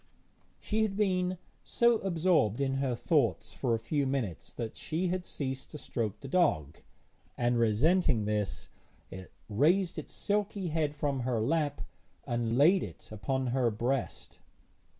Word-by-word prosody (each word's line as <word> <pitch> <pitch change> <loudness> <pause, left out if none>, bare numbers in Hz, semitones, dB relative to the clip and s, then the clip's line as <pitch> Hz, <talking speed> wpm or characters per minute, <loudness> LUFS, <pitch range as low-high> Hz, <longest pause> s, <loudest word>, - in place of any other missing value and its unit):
She 220 +1 -1
had 205 -3 0
been 185 -3 +1 0.3
so 235 -1 +3
absorbed 170 - +2
in 135 -1 0
her 135 -3 0
thoughts 120 - +1
for 120 -4 0
a - - 0
few 140 +5 -1
minutes 125 - -3
that 115 -2 -5
she 170 +3 -2
had 180 0 -2
ceased 135 -2 -4
to - - -8
stroke 115 -7 -3
the 135 - -7
dog, 130 - +1 0.6
and, 120 0 +1
resenting 120 - +3
this, 105 -1 -2 0.4
it 95 -1 -9 0.2
raised 165 - +2
its 150 - -9
silky 205 -2 -1
head 155 -2 0
from 145 -2 -1
her 120 -2 0
lap 150 +6 0 0.4
and 120 0 -1
laid 175 +7 +6
it - - -8
upon 130 +6 -2
her 130 -3 +2
breast. 120 +4 -3
135 Hz, 150 wpm, -30 LUFS, 115-175 Hz, 0.6 s, laid